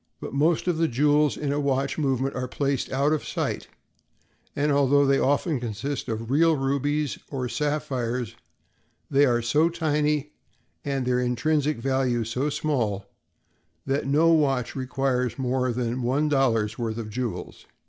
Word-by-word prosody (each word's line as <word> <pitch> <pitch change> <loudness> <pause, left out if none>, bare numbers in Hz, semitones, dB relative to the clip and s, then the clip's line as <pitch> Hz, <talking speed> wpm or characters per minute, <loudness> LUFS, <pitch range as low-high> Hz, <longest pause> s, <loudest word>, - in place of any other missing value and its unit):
But - - -7
most 155 +5 +2
of 170 -3 +1
the 165 - +3
jewels 150 +2 +2
in 145 -2 -2
a 145 - 0
watch 140 +1 0
movement 135 -2 0
are 125 0 -3
placed 140 0 -1
out 140 +3 +2
of 155 - -1
sight; - - -3 0.9
and, 145 +1 +1
although 140 0 +4
they 135 0 +3
often 145 +1 +1
consist 120 +4 -4
of 115 +1 -4
real 160 +3 +4
rubies 140 +2 -1
or 130 -3 -3
sapphires, 130 -5 -2 0.8
they 140 +1 +5
are 120 -1 +1
so 150 +8 +3
tiny 150 -3 0 0.5
and 135 -2 -2
their 125 0 +1
intrinsic 140 +4 +1
value 130 -1 0
so 125 +6 -1
small 125 -10 -1 0.8
that 135 0 -1
no 155 +4 +4
watch 135 -6 +2
requires 130 -2 -1
more 130 -1 0
than 120 +1 -2
one 135 +5 +1
dollar's 115 -6 +1
worth 115 -1 -2
of 110 -2 -5
jewels. 120 0 -5
135 Hz, 150 wpm, -25 LUFS, 125-150 Hz, 0.9 s, they